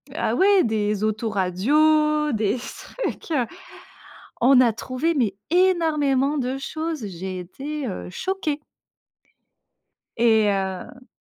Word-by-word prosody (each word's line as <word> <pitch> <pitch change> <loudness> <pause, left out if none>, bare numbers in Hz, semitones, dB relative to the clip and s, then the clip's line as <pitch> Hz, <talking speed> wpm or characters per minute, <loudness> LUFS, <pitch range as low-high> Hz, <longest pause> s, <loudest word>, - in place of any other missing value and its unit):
ah - - 0
ouais, 390 0 +5
des 210 -2 0
autoradios, 280 - +2
des 215 +2 0
trucs, 330 - -6
heu 260 -6 +2 1.0
on 255 +1 +6
a 240 -3 +4
trouvé 255 +9 -2
mais 230 -9 +1 0.2
énormément 305 -6 +2
de 260 0 -1
choses 315 -4 -4
j'ai 185 0 -6
été, 275 - -6
heu, 185 - -6
choquée. 310 - -3 1.6
Et, 220 -2 +4
heu 195 +6 -4
255 Hz, 105 wpm, -23 LUFS, 215-305 Hz, 1.6 s, on